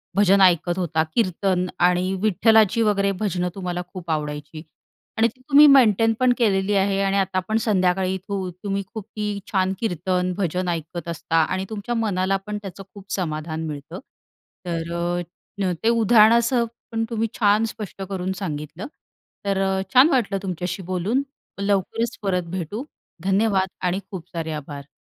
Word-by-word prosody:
भजन 200 0 +5
ऐकत 175 -1 +4
होता, 160 -3 +1
कीर्तन 185 -3 +1 0.2
आणि 180 +1 +1
विठ्ठलाची 220 +1 +4
वगैरे 200 -2 +2
भजनं 180 -4 -1
तुम्हाला 180 -2 -3
खूप 180 -3 -8
आवडायची 150 0 -4 0.5
आणि 225 +1 +4
तुम्ही 280 +3 +6
मेंटेनपण 235 -2 +5
केलेली 205 -3 +2
आहे. 195 0 +2
आणि 195 0 +1
आता 190 -1 +1
पण 220 - +2
संध्याकाळी 185 -2 +2
तू 195 -2 -2
तुम्ही 200 -1 -1
खूप 220 -4 -6 0.5
छान 190 -2 +1
कीर्तन, 180 -2 -1
भजन 180 -1 -1
ऐकत 170 +1 -4
असता 165 -1 -3
आणि 185 +4 -2
तुमच्या 220 +2 -4
मनाला 195 -4 +1
पण 210 0 -3
त्याचं 195 -1 -8
खूप 200 -1 -13
समाधान 160 -2 -3
मिळतं. 150 +4 -7 0.7
तर 170 +1 -2 0.6
ते 225 - +4
उदाहरणासह 235 +2 +4 0.3
पण 225 0 -1
तुम्ही 225 -1 -1
छान 210 0 +4
स्पष्ट 210 -3 -7
करून 190 -1 -2
सांगितलं. 155 - -5 0.6
तर 200 -1 0 0.4
छान 260 +5 +7
वाटलं 230 -9 +1
तुमच्याशी 180 0 -4
बोलून 205 +9 0 0.4
लवकरच 205 +4 0
परत 185 -3 0
भेटू. 185 - -4 0.4
धन्यवाद 195 0 +2 0.2
आणि 180 +1 +1
खूप 185 -4 -7
सारे 165 -1 -3
आभार. 140 -1 -9
190 Hz, 140 wpm, -23 LUFS, 175-215 Hz, 0.7 s, छान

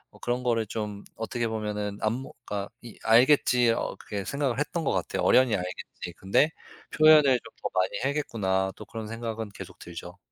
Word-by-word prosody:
뭐 - - -16
그런 125 +1 -1
거를 115 -2 +1
좀 105 -1 -5
어떻게 115 +1 -2
보면은 105 -2 -3
안 110 0 +1
뭐 130 +3 -6
그러니까 100 -1 -4
이 120 -3 -11
'알겠지.' 125 0 +5
어 - - -2
그렇게 100 -2 -5
생각을 135 +1 -1
했던 165 +3 -1
것 - - +1
같아요. - - -1
'어련히 130 -3 +5
알겠지.' 90 -1 -6
근데 100 +11 +3 0.5
'표현을 155 0 +8 0.2
좀 - - -13
더 - - -2
많이 95 0 +2
해야겠구나.' 100 -10 0
또 105 - -9
그런 110 -1 -7
생각은 115 -2 -4
계속 - - -10
들죠. 85 +1 -9
110 Hz, 380 characters per minute, -27 LUFS, 100-125 Hz, 0.5 s, 표현을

